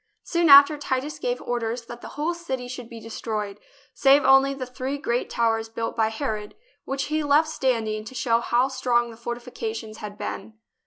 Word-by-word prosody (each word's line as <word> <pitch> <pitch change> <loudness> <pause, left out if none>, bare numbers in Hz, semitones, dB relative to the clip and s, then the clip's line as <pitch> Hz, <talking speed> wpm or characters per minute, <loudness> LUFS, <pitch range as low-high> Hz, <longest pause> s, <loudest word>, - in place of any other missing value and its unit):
Soon 340 -2 +1
after, 285 +1 +9
Titus 290 +2 -2
gave 245 -2 -1
orders 235 0 -2
that 240 0 -9
the - - -8
whole 310 +4 0
city 265 -8 -5
should 245 -2 -8
be 230 - -9
destroyed, 215 -2 -5 0.3
save 275 +1 +5
only 270 +1 +6
the 270 -2 -5
three 255 +2 -4
great 245 -4 -1
towers 225 -1 0
built 225 0 -4
by 220 -1 +2
Herod, 220 -3 -4 0.3
which 270 0 -2
he 310 +1 -1
left 295 +2 +3
standing 225 -7 -1
to 260 - -10
show 230 -1 +2
how 240 +2 +2
strong 245 -3 0
the - - -11
fortifications 230 -2 -5
had 210 -1 -8
been. 215 +2 -6
245 Hz, 180 wpm, -25 LUFS, 225-275 Hz, 0.3 s, after